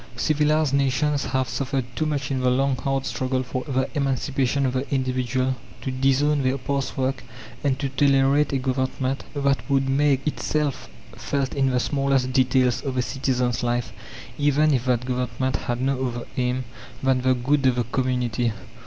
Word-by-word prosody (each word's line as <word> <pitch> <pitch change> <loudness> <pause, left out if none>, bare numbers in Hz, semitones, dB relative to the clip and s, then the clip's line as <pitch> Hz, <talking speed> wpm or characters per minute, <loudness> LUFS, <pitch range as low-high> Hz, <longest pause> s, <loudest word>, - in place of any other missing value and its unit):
Civilized 150 +2 +2
nations 140 +1 +1
have 130 -1 0
suffered 130 +1 -2
too 155 - 0
much 140 -2 -2
in 130 - 0
the 130 0 +2
long, 135 +1 +2
hard 135 +1 -1
struggle 130 0 -1
for 130 0 -4
the 130 -2 0
emancipation 135 -1 0
of 130 - 0
the 130 +1 -3
individual, 130 -1 0 0.2
to 130 - -4
disown 135 +3 +2
their 130 +1 +1
past 135 +1 -3
work 130 0 -1 0.4
and 135 -2 +1
to 140 0 -2
tolerate 135 +1 +3
a 135 - +1
Government 130 0 -1
that 140 -1 0
would 135 -1 +2
make 135 0 +2
itself 150 -1 -1 0.3
felt 140 -2 -2
in 135 -1 +2
the 125 -1 +1
smallest 135 -2 +1
details 130 -2 +3
of 135 -2 -3
a 125 - +2
citizen's 125 -2 -1
life, 120 -2 -1 0.5
even 145 +1 +3
if 125 -2 0
that 125 -1 +1
Government 125 0 -1
had 120 0 -3
no 130 0 0
other 120 -1 -5
aim 125 0 0 0.4
than 130 -1 +2
the 130 0 +3
good 135 +3 +2
of 130 - +3
the 120 - +1
community. 125 -1 -1
130 Hz, 170 wpm, -24 LUFS, 125-140 Hz, 0.5 s, tolerate